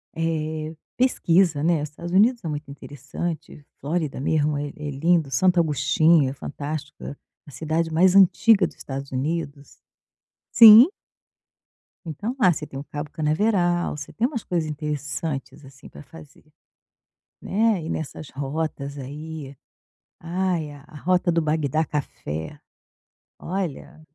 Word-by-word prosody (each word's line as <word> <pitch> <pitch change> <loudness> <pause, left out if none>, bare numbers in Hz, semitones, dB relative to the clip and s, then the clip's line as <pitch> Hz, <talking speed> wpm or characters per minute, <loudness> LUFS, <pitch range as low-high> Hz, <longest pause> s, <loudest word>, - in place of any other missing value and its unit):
eh, 155 -1 -2 0.2
pesquisa, 180 - +2
né, 165 -2 +2
Estados 155 +3 -7
Unidos 220 +5 +3
é - - -4
muito 150 -1 -5
interessante, 145 +3 -7 0.2
Flórida 155 -1 -2
mesmo 150 +1 +1
é 145 0 -3
é 150 -1 -6
lindo, 160 +2 +1
Santo 180 +7 +3
Augustinho 155 0 +3
é - - -5
fantástica, 145 +1 -6 0.3
a 145 - -13
cidade 160 +4 -2
mais 180 +3 +4
antiga 195 +1 +5
do - - -13
Estados 135 0 -7
Unidos. 145 +1 -4 0.7
Sim. 230 +4 +10 1.2
Então 205 - -4
lá, 185 -5 +5
você 150 -1 -5
tem 135 - -8
o 140 - -7
cabo 145 0 -6
Canaveral, 175 +2 0
você 145 0 -8
tem 230 - +1
umas 245 -5 -4
coisas 170 -3 -2
interessantes, 150 -1 -5
assim, 135 -1 -14
pra - - -12
fazer, 155 0 -15 1.0
né, 215 -1 +1
ir 160 - -6
nessas 155 -2 -5
rotas 140 0 -4
aí. 145 +1 -8 0.6
Ai, 170 -2 -2
a 145 -1 -13
a 155 - -16
rota 180 +2 +1
do 165 0 +1
Bagdá 155 -1 0
Café, 80 - -5 0.8
olha, 175 -4 -5
155 Hz, 130 wpm, -23 LUFS, 145-175 Hz, 1.2 s, Sim